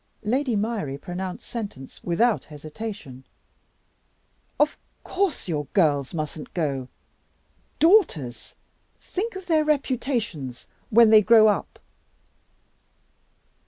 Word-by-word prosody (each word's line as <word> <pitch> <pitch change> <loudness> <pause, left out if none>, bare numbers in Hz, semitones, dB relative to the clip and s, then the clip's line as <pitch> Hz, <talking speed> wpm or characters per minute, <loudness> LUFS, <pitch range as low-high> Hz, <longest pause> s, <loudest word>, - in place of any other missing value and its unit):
Lady 250 +3 0
Myrie 205 -10 -2
pronounced 180 +4 -6
sentence 200 - -7
without 220 +7 +1
hesitation. 155 - -8 1.4
"Of 300 +1 +3 0.3
course 370 - -1
your 150 -4 -2
girls 145 -8 +2
mustn't 155 -2 -6
go. 140 -7 -1 0.9
Daughters! 235 - +2 0.4
Think 420 +3 -4
of 380 -1 -7
their 320 -3 +3
reputations 245 - -2 0.2
when 225 0 +6
they 215 -1 +8
grow 215 0 +6
up!" 205 - -2
210 Hz, 90 wpm, -24 LUFS, 150-250 Hz, 1.4 s, they